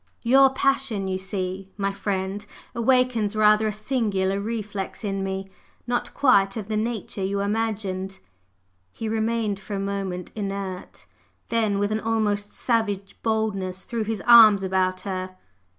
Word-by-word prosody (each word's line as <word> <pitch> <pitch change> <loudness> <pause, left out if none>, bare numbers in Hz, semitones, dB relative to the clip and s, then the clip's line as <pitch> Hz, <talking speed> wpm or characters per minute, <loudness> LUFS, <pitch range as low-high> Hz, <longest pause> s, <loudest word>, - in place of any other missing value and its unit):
"Your 270 +3 +6
'passion,' 265 -6 0
you 185 0 -2
see, 190 0 -4
my 195 -1 -1
friend, 195 0 -3 0.3
awakens 235 -3 +2
rather 215 0 +4
a - - 0
singular 205 -4 -1
'reflex' 210 -3 -4
in 195 -2 -2
me! 195 0 -3 0.4
not 240 0 -1
quite 200 -8 +4
of 215 -1 -6
the 215 - -1
nature 215 -3 -2
you 200 +1 -1
imagined!" 200 -3 -2 0.7
He 225 - -5
remained 220 -2 -1
for 200 +1 -6
a - - -2
moment 195 -2 -3
inert; 195 -3 -5 0.4
then, 220 -3 +1
with 205 +1 0
an 215 - 0
almost 210 -2 0
savage 205 -5 -1
boldness, 195 -4 -1
threw 230 -2 -3
his 215 -2 -3
arm 225 -3 +9
about 185 -1 0
her. 185 -1 -5
205 Hz, 140 wpm, -24 LUFS, 195-225 Hz, 0.7 s, arm